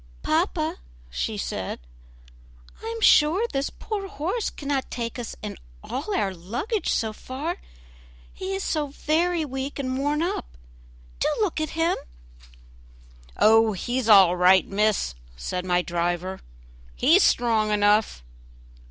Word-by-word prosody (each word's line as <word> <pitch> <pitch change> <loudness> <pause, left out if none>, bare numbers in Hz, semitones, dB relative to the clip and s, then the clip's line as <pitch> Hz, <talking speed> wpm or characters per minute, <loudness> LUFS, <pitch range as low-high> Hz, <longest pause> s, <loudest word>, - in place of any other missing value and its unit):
"Papa," - - 0 0.3
she - - -2
said, - - -4 1.0
"I - - -7
am 455 0 -4
sure 335 +5 +5
this 275 -8 -2
poor 410 -3 -5
horse 390 +4 -2
cannot 280 -2 -3
take 235 0 -4
us 235 - -6
and 210 - -6 0.2
all 305 +11 -3
our 195 - 0
luggage 240 - -3
so 220 -1 0
far, 280 +10 -5 0.8
he 385 +1 -4
is 385 - -3
so 305 -2 -1
very 320 +4 0
weak 265 0 -5
and 260 -2 -2
worn 295 +3 0
up. - - -4 0.6
Do - - +1
look 390 -7 0
at 310 +1 -4
him." 330 +1 +2 1.4
"Oh! 225 0 +5
he's 240 +4 -2
all 190 -4 +8
right, 180 +1 +5
miss," 205 - +1 0.2
said 180 - -4
my 180 0 +2
driver, 175 +2 -2 0.6
"he's 325 +10 +5
strong 225 - +3
enough." 210 - +2
255 Hz, 130 wpm, -25 LUFS, 200-325 Hz, 1.4 s, all